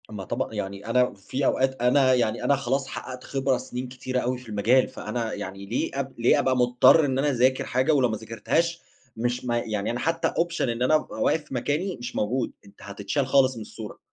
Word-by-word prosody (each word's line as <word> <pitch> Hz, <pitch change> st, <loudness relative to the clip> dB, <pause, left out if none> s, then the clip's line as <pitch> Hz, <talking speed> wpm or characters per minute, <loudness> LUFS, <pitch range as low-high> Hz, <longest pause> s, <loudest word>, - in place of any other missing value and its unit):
أمّا 105 Hz, -3 st, -6 dB
طبعًا -, -, -3 dB
يعني 100 Hz, +1 st, -5 dB
أنا 125 Hz, +2 st, +2 dB
في 130 Hz, +8 st, -4 dB
أوقات 130 Hz, -1 st, +1 dB
أنا 130 Hz, +1 st, +4 dB
يعني 120 Hz, -3 st, 0 dB
أنا 140 Hz, -, +3 dB
خلاص 135 Hz, 0 st, -1 dB
حقّقت 130 Hz, -1 st, -7 dB
خبرة 135 Hz, -1 st, 0 dB
سِنين 125 Hz, 0 st, -6 dB
كتيرة 130 Hz, 0 st, -3 dB
أوي 125 Hz, +1 st, -1 dB
في 125 Hz, -2 st, -13 dB
المجال، 110 Hz, +5 st, +3 dB
فأنا 115 Hz, -3 st, -4 dB
يعني 100 Hz, -1 st, -6 dB
ليه 115 Hz, +5 st, -2 dB
أب 135 Hz, -1 st, -4 dB
ليه 115 Hz, -, +4 dB
أبقى 130 Hz, -1 st, +1 dB
مُضطر 125 Hz, +5 st, +5 dB
إن 130 Hz, -2 st, 0 dB
أنا 145 Hz, +2 st, +2 dB
أذاكر 130 Hz, 0 st, +2 dB
حاجة 130 Hz, +5 st, +1 dB
ولو 130 Hz, -4 st, +3 dB
ما 110 Hz, -, -2 dB
ذاكرتهاش 115 Hz, +11 st, -1 dB, 0.4 s
مش 120 Hz, +2 st, -2 dB
ما 120 Hz, -1 st, 0 dB
يعني 105 Hz, -2 st, -2 dB
أنا 120 Hz, -, -3 dB
حتّى 165 Hz, +3 st, 0 dB
option 170 Hz, 0 st, -1 dB
إن 120 Hz, 0 st, -1 dB
أنا 130 Hz, +5 st, +4 dB
أبقى 155 Hz, -, -2 dB
واقف 160 Hz, -, +2 dB
في 150 Hz, -, -12 dB
مكاني، 150 Hz, +9 st, -1 dB
مش 120 Hz, +1 st, -7 dB
موجود، 125 Hz, +5 st, -1 dB
أنت 100 Hz, -, -18 dB
هتتشال 100 Hz, +7 st, -3 dB
خالص 130 Hz, -1 st, +4 dB
من 115 Hz, -, -7 dB
الصورة. 105 Hz, 0 st, -9 dB
125 Hz, 210 wpm, -25 LUFS, 115-135 Hz, 0.4 s, مُضطر